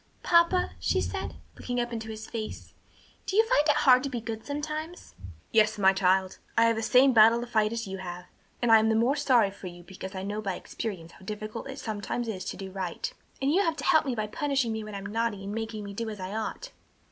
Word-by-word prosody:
'" - - -35
"Papa," 340 +1 +4
she - - +1
said, - - -3 0.2
looking 245 0 -3
up 240 0 -2
into 225 -1 -5
his 220 0 -7
face, 220 -2 -6 0.5
"do 385 - -2
you 445 +2 +6
find 375 -11 +3
it 295 - +5
hard 255 -2 +7
to 275 - -3
be 245 -3 -3
good 225 -1 -6
sometimes?" 305 +4 -5 0.4
"Yes, 215 -1 +4
my 195 -1 +5
child; 190 0 +1 0.2
I 230 - +6
have 230 0 +3
the 225 - -2
same 255 +3 +5
battle 225 +1 +7
to 240 - -4
fight 220 -3 +2
that 230 +1 -3
you 195 -1 -6
have, 180 -1 -7 0.4
and 240 - +3
I 225 - +9
am 220 +1 +2
the 220 - +3
more 240 +5 +3
sorry 250 -8 +3
for 195 -1 -9
you 175 0 -10
because 190 +2 -8
I 190 - -4
know 205 +2 -3
by 195 -3 -2
experience 175 -4 -6
how - - -18
difficult 215 +5 -6
it 270 - -7
sometimes 220 +1 -3
is 190 -4 -4
to - - -5
do 190 -1 -7
right." 185 -3 -4 0.3
"And 275 - +3
you 380 - +4
have 330 -5 +1
to - - -6
help 310 -2 +4
me 255 - -1
by 215 -2 -1
punishing 270 0 -1
me 220 0 -3
when 215 -1 -7
I'm 195 0 -6
naughty, 215 -1 -2
and 200 +1 -5
making 225 -1 -4
me 200 0 -7
do 225 +2 -3
as 210 -2 -7
I 185 +1 -5
ought?" 220 - -4
220 Hz, 250 wpm, -28 LUFS, 200-255 Hz, 0.5 s, I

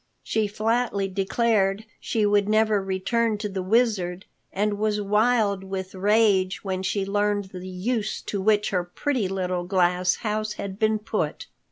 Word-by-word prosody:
She 220 -1 0
flatly 215 -1 0
declared 195 +1 +1
she 220 -2 0
would 205 0 +2
never 215 -1 +3
return 210 +4 0
to 210 0 -3
the 190 -2 -4
Wizard 190 -3 +1 0.3
and 205 +1 -1
was 210 -1 +1
wild 210 -1 +2
with 190 -1 -5
rage 195 -2 +2
when 190 -2 -2
she 195 +1 -1
learned 205 -1 0
the 180 0 -7
use 215 +4 -2
to 200 - -3
which 210 +1 +2
her 180 -2 +1
pretty 230 +5 -1
little 185 -2 -2
glass 180 0 +2
house 215 -1 -2
had 200 -1 -6
been 220 0 +2
put. 215 +1 -3
205 Hz, 155 wpm, -25 LUFS, 190-215 Hz, 0.3 s, never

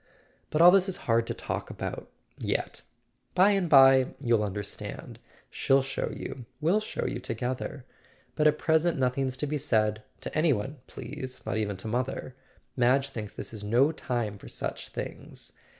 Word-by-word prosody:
But 155 - +1
all 175 - +10
this 190 0 +4
is 185 - -2
hard 115 0 +2
to - - -3
talk - - -4
about—yet. - - -5 0.5
By 190 +3 +6
and 195 -4 +1
bye 135 -2 +7
you'll 120 -5 +2
understand; 100 0 -6 0.3
she'll 135 0 +3
show 135 - -2
you, 125 -4 -7
we'll 170 +7 +3
show 215 - -4
you - - -2
together. 125 +3 -4 0.5
But 155 -1 +4
at 150 0 +3
present 160 +1 +2
nothing's 130 0 0
to 150 - -1
be 150 +1 -2
said—to 110 -3 -1
any 155 -1 +4
one, 125 +7 -4
please, 130 -1 -7
not - - -1
even 105 -3 -1
to 95 - -6
mother. 125 +2 -2 0.4
Madge 130 +2 +3
thinks 110 -6 -6
this - - -7
is 105 -2 -7
no 120 +8 +3
time 120 -9 -3
for - - -12
such - - -4
things. - - -8
130 Hz, 165 wpm, -28 LUFS, 115-150 Hz, 0.5 s, all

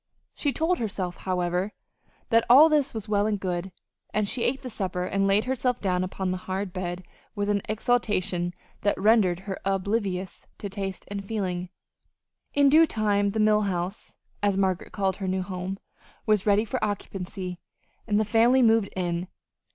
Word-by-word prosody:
She 290 - 0
told 325 +6 0
herself, 190 -5 -3
however, 180 +1 -1 0.6
that 230 -1 +4
all 290 +6 +9
this 295 -3 +2
was 220 -2 -6
well 205 0 +2
and 210 -2 0
good; 185 0 -3 0.4
and 210 -1 0
she 240 - -1
ate 265 +3 0
the 255 - -5
supper 185 -4 -2
and 195 +2 0
laid 200 +2 +4
herself 250 -1 0
down 185 -2 0
upon 185 0 -2
the 185 - -1
hard 190 0 -2
bed 180 -1 -4 0.3
with 205 0 -1
an 205 -1 +2
exaltation 205 -6 0 0.3
that 205 - +1
rendered 195 -4 +4
her 190 -1 -5
oblivious 195 -1 -2
to 200 - -6
taste 195 -2 -5
and 200 -1 -4
feeling. 185 -4 -3 0.9
In 285 -1 +5
due 315 +4 +6
time 205 -3 +1
the 215 +2 -2
Mill 215 0 +4
House, 185 -1 -3 0.2
as 200 -2 +2
Margaret 190 -2 0
called 190 -2 -1
her 195 - -4
new 185 0 0
home, 185 +1 -4 0.5
was 215 -2 +2
ready 205 +2 +4
for 215 - -3
occupancy, 185 -3 -4 0.5
and 210 -1 +2
the 215 - +2
family 235 +4 +4
moved 225 -3 +4
in. 175 -1 -2
200 Hz, 170 wpm, -26 LUFS, 185-220 Hz, 0.9 s, all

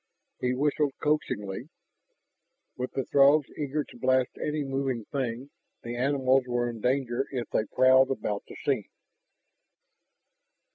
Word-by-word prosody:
He 125 0 0
whistled 145 +1 +1
coaxingly. 105 -10 -1 1.1
With 125 0 -4
the 135 - -1
Throgs 140 +1 +5
eager 150 0 -2
to 120 - -15
blast 130 0 +2
any 150 0 -1
moving 135 -4 -2
thing, 130 0 -3 0.3
the 120 0 -5
animals 130 0 +2
were 120 -1 0
in 115 -2 -6
danger 130 0 0
if 125 -4 -3
they 110 - +1
prowled 130 +3 +5
about 105 -6 -2
the - - -10
scene. - - -1
130 Hz, 130 wpm, -28 LUFS, 120-140 Hz, 1.1 s, Throgs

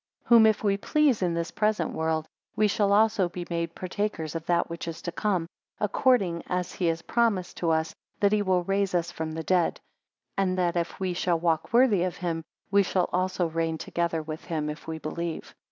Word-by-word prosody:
11 - - -31
Whom 230 -2 +8
if 215 0 +1
we 200 -1 +2
please 285 +1 +2
in 175 -2 +1
this 170 0 -2
present 215 0 0
world, 160 -1 -1 0.3
we 215 - +3
shall 200 0 +1
also 205 -3 +3
be 175 0 -6
made 170 0 -2
partakers 185 -4 -3
of 165 -1 -4
that 175 -1 +2
which 170 0 -6
is 165 - -5
to 170 - -3
come, 185 -1 0 0.3
according 205 -5 +2
as 180 -1 -2
he 180 - -1
has 165 0 -1
promised 225 -6 0
to 170 - 0
us, 160 0 +1 0.3
that 200 -2 +3
he 210 -1 +3
will 185 -3 +2
raise 195 0 0
us 170 -1 0
from 160 0 -4
the 160 0 -4
dead; 180 0 +1 0.6
and 185 -1 +1
that 175 -1 +1
if 170 -1 -2
we 185 -2 -1
shall 175 -1 +1
walk 160 -2 0
worthy 230 -5 +4
of 180 -1 -1
him, 165 -2 -2 0.3
we 200 0 +6
shall 185 -2 0
also 185 0 +1
reign 165 0 -1
together 170 -1 -2
with 155 0 -7
him, 155 -2 -2
if 150 - -10
we 160 0 -3
believe. 165 +1 -5
175 Hz, 210 wpm, -27 LUFS, 165-200 Hz, 0.6 s, Whom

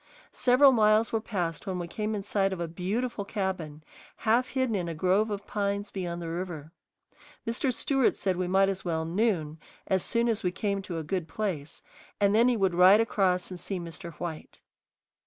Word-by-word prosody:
Several 260 +2 +5
miles 215 -1 +3
were 225 - +1
passed 180 -6 -3
when 185 -1 -2
we 175 -1 -4
came 215 +4 -3
in 200 - -4
sight 195 -1 +1
of 190 - -4
a 170 - -2
beautiful 200 +7 -2
cabin, 185 -7 -4 0.4
half 235 +3 +3
hidden 260 -3 -1
in 180 -4 -1
a 165 - -4
grove 190 +6 +2
of 205 -1 -4
pines 200 0 -2
beyond 175 -3 -4
the 165 - -4
river. 165 -3 -5 0.7
Mr. 240 +3 0
Stewart 265 +1 +1
said 190 -2 0
we 180 0 -2
might 195 +2 +4
as 195 -1 -2
well 160 -2 -1
"noon" 165 -4 0 0.3
as 190 -1 +1
soon 235 +5 0
as 225 -2 0
we 180 - 0
came 200 +1 -2
to 180 -3 -5
a 160 - -3
good 170 +2 -2
place, 160 -6 -4 0.4
and 200 -1 +3
then 230 +3 +5
he 245 -2 +2
would 190 -3 +2
ride 185 +4 +7
across 190 -5 +1
and 180 - -6
see 195 0 -4
Mr. 170 0 -8
White. 160 0 -7
195 Hz, 195 wpm, -28 LUFS, 175-215 Hz, 0.7 s, ride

